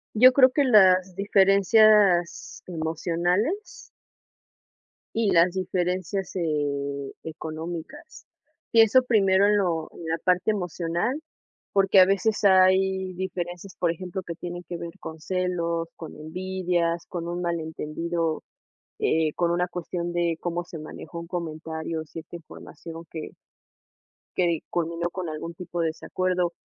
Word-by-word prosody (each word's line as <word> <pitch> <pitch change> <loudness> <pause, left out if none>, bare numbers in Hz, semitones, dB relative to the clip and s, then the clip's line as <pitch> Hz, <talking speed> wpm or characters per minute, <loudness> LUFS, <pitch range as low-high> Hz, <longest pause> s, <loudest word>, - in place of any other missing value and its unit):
Yo 255 +4 +8
creo 255 -1 +6
que 285 +1 +2
las 185 -6 +5
diferencias 200 -1 +4
emocionales 175 - -2 1.3
y 225 -2 +2
las 170 +1 +5
diferencias, 185 0 -2
eh, 140 -4 -2
económicas. 165 - -7 0.5
Pienso 225 +3 +6
primero 200 -5 +4
en 205 0 +4
lo 170 -5 0
en 170 - -10
la 165 0 0
parte 180 +3 +2
emocional, 180 - -2 0.5
porque 195 -1 +5
a 185 - +8
veces 200 +3 +1
hay 190 0 +4
diferencias, 180 0 -5
por 170 -2 +2
ejemplo, 185 +2 -6
que 170 - -5
tienen 175 +1 -7
que 175 - -4
ver 170 0 -6
con 160 -3 -8
celos, 170 -1 -1
con 160 - -9
envidias, 175 +1 -2
con 170 -1 -5
un 175 +1 -3
malentendido, 165 -1 -2 0.6
eh, 160 -1 +1
con 170 -1 +1
una 175 +1 +1
cuestión 175 0 -4
de 170 -2 0
cómo 175 0 -3
se 170 -1 -9
manejó 155 +2 -8
un 170 - -8
comentario, 160 -1 -4
cierta 160 +2 -10
información 165 0 -11
que 160 -2 -7 1.0
que 170 -3 +2
culminó 170 0 -2
con 180 -1 -5
algún 155 +2 -6
tipo 175 0 -5
de 165 - +1
desacuerdo. 180 +2 -1
175 Hz, 130 wpm, -25 LUFS, 165-190 Hz, 1.3 s, Yo